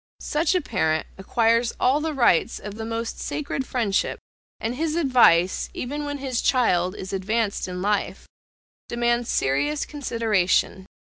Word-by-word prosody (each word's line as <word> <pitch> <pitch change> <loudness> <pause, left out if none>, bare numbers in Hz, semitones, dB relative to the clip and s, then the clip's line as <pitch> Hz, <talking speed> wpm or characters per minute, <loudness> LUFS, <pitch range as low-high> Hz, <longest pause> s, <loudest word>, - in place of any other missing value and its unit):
Such 310 +4 0
a 365 - +2
parent 160 - 0
acquires 230 +4 +2
all 265 +4 +3
the 315 -1 -2
rights 235 -10 +3
of 210 0 -7
the 220 +1 -6
most 230 0 -4
sacred 280 -2 -3
friendship, 220 -6 0 0.4
and 225 +2 -2
his 315 +4 -2
advice, 240 - +4
even 290 +4 -4
when 290 0 -3
his 265 -3 -2
child 185 -8 +2
is 190 0 -7
advanced 205 +2 -1
in 180 0 -5
life, 205 0 -1 0.6
demands 240 0 0
serious 140 +2 0
consideration. 220 -9 0
230 Hz, 140 wpm, -24 LUFS, 190-265 Hz, 0.6 s, advice